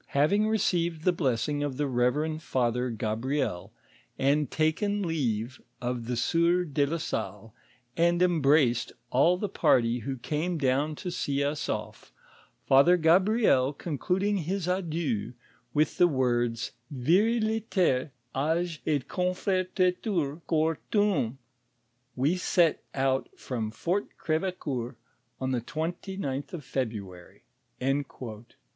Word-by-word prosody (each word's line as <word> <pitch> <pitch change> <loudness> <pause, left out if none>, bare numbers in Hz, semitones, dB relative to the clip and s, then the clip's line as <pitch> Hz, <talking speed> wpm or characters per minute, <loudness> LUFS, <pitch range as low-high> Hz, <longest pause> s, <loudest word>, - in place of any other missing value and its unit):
Having 200 +10 +3
received 175 -6 0
the 180 - +4
blessing 145 -2 0
of 145 -3 -2
the 145 - 0
reverend 145 +5 0
father 125 -2 0
Gabriel, 115 -2 -2 0.5
and 140 0 +2
taken 200 +7 0
leave 130 - -2 0.2
of 120 -2 -3
the 125 - -1
sieur 170 +7 +2
de 145 -3 0
la 165 +4 -1
Salle, 110 - -4 0.4
and 170 +1 +3
embraced 150 -8 +3 0.2
all 170 +8 +4
tiie 205 -1 -3
party 120 0 +3
who 130 +3 -4
came 155 +7 -2
down 145 +2 +1
to 180 +4 -5
see 140 -5 -1
us 145 +1 -2
ofi; - - -5 0.6
Father 140 +7 +6
Gabriel 170 - +4
concluding 180 +7 -1
his 185 +1 -2
adieu 165 - -1 0.4
with 155 +1 +1
the 175 - +7
words, 120 -5 0
' 120 - -35
Viriliter 195 - +2 0.3
age 160 +3 -1
ct 145 -4 0
confortetur 180 -3 0
cor 160 -1 +1
tuum,' 190 - +1 0.8
we 145 +8 +1
set 175 -2 +2
out 135 -1 +1
from 115 -4 -3
Fort 175 - -1
Crdveeoeur 155 -7 -2 0.4
on 130 0 -1
the 125 -2 0
29th 160 - -4
of 155 -6 -6
February," 105 -9 -5 0.4
Ac. 135 +2 +1
150 Hz, 120 wpm, -28 LUFS, 130-175 Hz, 0.8 s, the